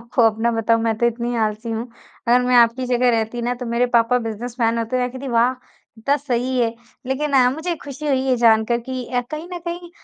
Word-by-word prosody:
आपको 235 Hz, +1 st, 0 dB
अपना 225 Hz, +1 st, +2 dB
बताऊँ 225 Hz, 0 st, +2 dB
मैं 225 Hz, -1 st, 0 dB
तो 235 Hz, -, +3 dB
इतनी 235 Hz, +1 st, -2 dB
आलसी 215 Hz, +2 st, -4 dB
हूँ, 225 Hz, +2 st, -3 dB, 0.4 s
अगर 245 Hz, +1 st, +5 dB
मैं 250 Hz, 0 st, +1 dB
आपकी 235 Hz, +2 st, +4 dB
जगह 245 Hz, 0 st, +2 dB
रहती 230 Hz, +1 st, -1 dB
न 245 Hz, +1 st, 0 dB
तो 250 Hz, -, -4 dB
मेरे 235 Hz, +2 st, +1 dB
पापा 235 Hz, +2 st, +3 dB
बिज़नेसमैन 230 Hz, +1 st, -2 dB
होते 230 Hz, +2 st, -2 dB
मैं 250 Hz, 0 st, -1 dB
कहती 260 Hz, +1 st, -7 dB
वाह! 235 Hz, +1 st, +3 dB, 0.4 s
कितना 235 Hz, +6 st, 0 dB
सही 255 Hz, -2 st, -1 dB
है। 230 Hz, -1 st, 0 dB, 0.3 s
लेकिन 280 Hz, +3 st, -1 dB
अ, 255 Hz, -2 st, +5 dB
मुझे 320 Hz, +6 st, -3 dB
खुशी 290 Hz, +1 st, -8 dB
हुई 270 Hz, -2 st, +2 dB
ये 255 Hz, -1 st, +2 dB
जानकर 230 Hz, 0 st, +3 dB
कि 255 Hz, 0 st, -5 dB
अ, 250 Hz, -1 st, -1 dB
कहीं 310 Hz, +3 st, -6 dB
न 350 Hz, -, -4 dB
कहीं 345 Hz, 0 st, -5 dB
245 Hz, 220 wpm, -21 LUFS, 230-260 Hz, 0.4 s, अगर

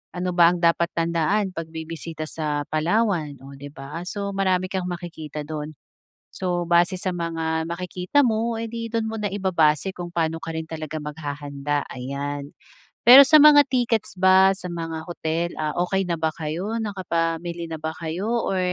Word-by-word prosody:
ano 180 Hz, +1 st, -2 dB
ba 170 Hz, -1 st, +6 dB
ang 175 Hz, -, -4 dB
dapat 170 Hz, 0 st, +3 dB
tandaan 170 Hz, +4 st, 0 dB
pag 165 Hz, -1 st, -5 dB
bibisita 160 Hz, -1 st, -6 dB
sa 150 Hz, -2 st, -2 dB
Palawan, 165 Hz, -3 st, 0 dB
oh, 140 Hz, +1 st, -11 dB
'di 140 Hz, +1 st, -9 dB
ba. 150 Hz, +5 st, -7 dB
So, 200 Hz, +1 st, -3 dB
marami 185 Hz, -1 st, +1 dB
kang 190 Hz, -2 st, -2 dB
makikita 170 Hz, -4 st, -6 dB
do'n. 155 Hz, 0 st, -5 dB, 0.6 s
So, 180 Hz, -2 st, -2 dB
base 175 Hz, +2 st, +4 dB
sa 185 Hz, -, -1 dB
mga 165 Hz, -2 st, -2 dB
makikita 180 Hz, +8 st, 0 dB
mo, 230 Hz, 0 st, 0 dB
eh, 230 Hz, 0 st, -4 dB
'di 230 Hz, -1 st, -4 dB
doon 225 Hz, -1 st, 0 dB
mo 225 Hz, -, -4 dB
na 210 Hz, -, -1 dB
ibabase 185 Hz, -3 st, +2 dB
kung 175 Hz, -1 st, -6 dB
paano 165 Hz, -1 st, 0 dB
ka 165 Hz, 0 st, -6 dB
rin 160 Hz, 0 st, -5 dB
talaga 155 Hz, -1 st, -5 dB
maghahanda, 145 Hz, -1 st, -3 dB
ayan. 140 Hz, +3 st, -5 dB, 0.5 s
Pero 265 Hz, +4 st, +10 dB
sa 305 Hz, 0 st, +7 dB
mga 290 Hz, -1 st, +8 dB
tickets 245 Hz, -6 st, 0 dB
ba, 190 Hz, +1 st, +6 dB
sa 185 Hz, -2 st, -7 dB
mga 165 Hz, -2 st, -4 dB
hotel, 170 Hz, 0 st, -2 dB
ah, 155 Hz, -1 st, -2 dB
okey 190 Hz, +1 st, 0 dB
na 175 Hz, -, 0 dB
ba 160 Hz, 0 st, +1 dB
kayo 170 Hz, +8 st, -3 dB
nakapamili 170 Hz, -5 st, -2 dB
na -, -, -3 dB
ba 160 Hz, +1 st, -3 dB
kayo 170 Hz, +6 st, -3 dB, 0.2 s
or, 190 Hz, -, 0 dB
170 Hz, 175 wpm, -23 LUFS, 155-190 Hz, 0.6 s, Pero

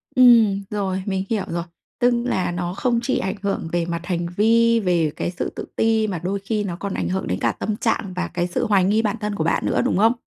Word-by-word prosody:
Ừm, 230 Hz, -6 st, +6 dB
rồi, 190 Hz, -2 st, -2 dB
mình 190 Hz, -2 st, -1 dB
hiểu 215 Hz, -4 st, 0 dB
rồi. 170 Hz, 0 st, -3 dB, 0.4 s
Tức 245 Hz, -1 st, +4 dB
là 185 Hz, -8 st, 0 dB
nó 175 Hz, 0 st, -3 dB
không 235 Hz, +4 st, 0 dB
chỉ 260 Hz, -, 0 dB
ảnh 190 Hz, -, -2 dB
hưởng 200 Hz, -4 st, -2 dB
về 175 Hz, -1 st, 0 dB
mặt 170 Hz, 0 st, -4 dB
hành 175 Hz, -1 st, -1 dB
vi, 230 Hz, +2 st, +4 dB
về 175 Hz, -6 st, +1 dB
cái -, -, -2 dB
sự 180 Hz, -, -3 dB
tự -, -, -5 dB
ti 225 Hz, -1 st, +2 dB
mà 185 Hz, -5 st, -3 dB
đôi 195 Hz, +2 st, -1 dB
khi 210 Hz, +2 st, -2 dB
nó 185 Hz, -4 st, -3 dB
còn 195 Hz, +2 st, -5 dB
ảnh -, -, -2 dB
hưởng 190 Hz, +1 st, -2 dB
đến 90 Hz, -, -1 dB
cả 115 Hz, -, +1 dB
tâm 210 Hz, -, -3 dB
trạng 220 Hz, -4 st, -1 dB
và 180 Hz, -, -2 dB
cái 175 Hz, 0 st, -2 dB
sự 175 Hz, -, -1 dB
hoài 200 Hz, -3 st, +3 dB
nghi 210 Hz, +4 st, +3 dB
bản 215 Hz, 0 st, -1 dB
thân 210 Hz, -1 st, -2 dB
của 160 Hz, -, -1 dB
bạn 165 Hz, -, 0 dB
nữa, -, -, +1 dB
đúng -, -, +1 dB
không? 225 Hz, +4 st, +5 dB
195 Hz, 255 wpm, -22 LUFS, 175-220 Hz, 0.4 s, Ừm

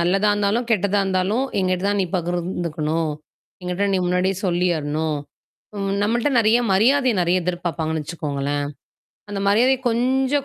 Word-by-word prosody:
நல்லதா 195 Hz, +4 st, +2 dB
இருந்தாலும், 205 Hz, +4 st, 0 dB
கெட்டதா 205 Hz, -2 st, +2 dB
இருந்தாலும் 190 Hz, +6 st, 0 dB, 0.2 s
எங்கிட்ட 185 Hz, 0 st, 0 dB
தான் 205 Hz, 0 st, +1 dB
நீ 185 Hz, -, 0 dB
பகிர்ந்துக்கணும். 170 Hz, -3 st, -2 dB, 0.5 s
எங்கிட்ட 180 Hz, +3 st, -1 dB
நீ -, -, +2 dB
முன்னாடியே 180 Hz, +1 st, +1 dB
சொல்லியரணும். 160 Hz, -4 st, 0 dB, 0.6 s
ம் 195 Hz, -1 st, -1 dB
நம்மள்ட்ட 235 Hz, +6 st, +1 dB
நெறைய 225 Hz, +1 st, +4 dB
மரியாதைய 255 Hz, +5 st, +3 dB
நெறைய 175 Hz, +1 st, +1 dB
எதிர்பார்ப்பாங்கன்னு 165 Hz, -3 st, -2 dB
வச்சுக்கோங்களேன். 145 Hz, -2 st, -3 dB, 0.7 s
அந்த 200 Hz, -1 st, -3 dB
மரியாதை 240 Hz, +6 st, +4 dB
கொஞ்சம் 265 Hz, +4 st, +1 dB
185 Hz, 125 wpm, -22 LUFS, 170-210 Hz, 0.7 s, நெறைய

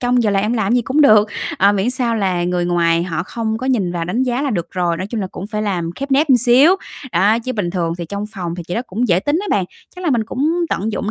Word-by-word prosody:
trong 245 Hz, 0 st, +2 dB
giờ 215 Hz, -, +1 dB
làm 195 Hz, -1 st, +1 dB
em 215 Hz, +3 st, 0 dB
làm 220 Hz, -2 st, 0 dB
cái -, -, +4 dB
gì 245 Hz, -, +2 dB
cũng 265 Hz, +6 st, 0 dB
được." 215 Hz, -7 st, +6 dB, 0.3 s
Ờ, 200 Hz, +2 st, +5 dB
miễn 205 Hz, +4 st, 0 dB
sao 245 Hz, -2 st, -1 dB
là 185 Hz, -4 st, 0 dB
người 180 Hz, 0 st, 0 dB
ngoài 170 Hz, -1 st, +2 dB
họ 170 Hz, -2 st, -3 dB
không 220 Hz, +3 st, -3 dB
có 255 Hz, -, -4 dB
nhìn 205 Hz, -9 st, 0 dB
vào 170 Hz, -1 st, -2 dB
đánh 185 Hz, +9 st, -1 dB
giá 255 Hz, +1 st, -1 dB
là 280 Hz, -, -1 dB
được 175 Hz, -7 st, -3 dB
rồi, 175 Hz, -2 st, -1 dB
nói 185 Hz, +3 st, -4 dB
chung 220 Hz, 0 st, -4 dB
là 190 Hz, -, -2 dB
cũng 185 Hz, +1 st, -8 dB
phải 210 Hz, 0 st, -3 dB
làm 180 Hz, -5 st, -2 dB
khép 275 Hz, 0 st, -5 dB
nép 285 Hz, +3 st, +3 dB
một 260 Hz, -, +6 dB
xíu, 260 Hz, -, +5 dB, 0.4 s
đó. 215 Hz, +4 st, +3 dB
Chứ 255 Hz, +2 st, -4 dB
bình 195 Hz, -6 st, -2 dB
thường 170 Hz, -2 st, -1 dB
thì 170 Hz, -, -4 dB
trong 200 Hz, +2 st, -4 dB
phòng 175 Hz, -3 st, -4 dB
thì 175 Hz, -, -6 dB
chị 175 Hz, -, -3 dB
đó 235 Hz, -, -1 dB
cũng 230 Hz, +6 st, -2 dB
dễ 180 Hz, 0 st, +3 dB
tính 290 Hz, -, 0 dB
á 410 Hz, -, -5 dB
bạn. 195 Hz, -, +2 dB, 0.3 s
Chắc 365 Hz, -, -7 dB
là 330 Hz, -, +1 dB
mình 230 Hz, -4 st, +1 dB
cũng 285 Hz, +8 st, -1 dB, 0.2 s
tận 215 Hz, +2 st, -2 dB
dụng 210 Hz, -, -2 dB
210 Hz, 305 wpm, -18 LUFS, 180-245 Hz, 0.4 s, được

